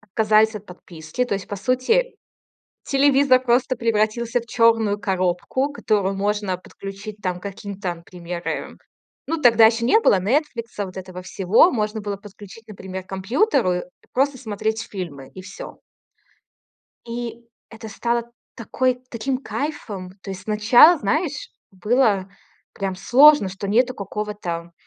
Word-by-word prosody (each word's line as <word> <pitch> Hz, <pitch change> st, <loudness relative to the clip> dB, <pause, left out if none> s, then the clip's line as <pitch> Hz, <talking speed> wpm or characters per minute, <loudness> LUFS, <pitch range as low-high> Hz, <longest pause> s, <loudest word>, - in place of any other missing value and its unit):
отказались 220 Hz, +1 st, +2 dB
от 210 Hz, 0 st, -8 dB
подписки, 175 Hz, +4 st, -5 dB
то 245 Hz, -, -2 dB
есть 195 Hz, -1 st, -6 dB
по 205 Hz, -, -4 dB
сути 255 Hz, -, +1 dB, 0.7 s
телевизор 275 Hz, -1 st, +4 dB
просто 255 Hz, +1 st, +1 dB
превратился 230 Hz, +1 st, 0 dB
в -, -, -14 dB
черную 225 Hz, -3 st, +2 dB
коробку, 190 Hz, +9 st, -1 dB
которую 205 Hz, -8 st, 0 dB
можно 205 Hz, -1 st, -1 dB
подключить 195 Hz, +3 st, -9 dB
там 180 Hz, -2 st, -2 dB
каким 200 Hz, +1 st, -8 dB
там 175 Hz, -4 st, -4 dB
пример. 175 Hz, 0 st, -6 dB, 0.5 s
Ну, 325 Hz, +1 st, -2 dB
тогда 230 Hz, -4 st, +7 dB
еще 230 Hz, +1 st, 0 dB
не 440 Hz, -, +5 dB
было 200 Hz, -, +4 dB
"Нетфликса", 230 Hz, -, -1 dB
вот 185 Hz, 0 st, -10 dB
этого 185 Hz, -1 st, -8 dB
всего. 190 Hz, -, +3 dB
Можно 215 Hz, -2 st, -2 dB
было 205 Hz, -1 st, -4 dB
подключить, 205 Hz, +2 st, -13 dB
например, 190 Hz, -2 st, -7 dB
к -, -, -33 dB
компьютеру 225 Hz, -, +1 dB
и 180 Hz, -, -4 dB, 0.3 s
просто 270 Hz, +1 st, +1 dB
смотреть 220 Hz, -1 st, -3 dB
фильмы 150 Hz, -9 st, -7 dB
и 185 Hz, -, -9 dB
всё. -, -, -10 dB, 1.3 s
И 235 Hz, 0 st, -6 dB, 0.2 s
это 225 Hz, -1 st, -9 dB
стало 235 Hz, +2 st, -2 dB, 0.2 s
такой 250 Hz, +2 st, -1 dB
таким 255 Hz, +3 st, -2 dB
кайфом. 215 Hz, -11 st, -5 dB
То 195 Hz, -, -7 dB
есть 190 Hz, -, -7 dB
сначала, 225 Hz, +10 st, +6 dB
знаешь, 310 Hz, -, -2 dB, 0.2 s
было 205 Hz, 0 st, +1 dB, 0.4 s
прям 195 Hz, -1 st, -3 dB
сложно, 260 Hz, +3 st, +6 dB
что 195 Hz, +1 st, -6 dB
нету 245 Hz, +4 st, +2 dB
какого-то 200 Hz, -5 st, -5 dB
215 Hz, 140 wpm, -22 LUFS, 190-245 Hz, 1.3 s, тогда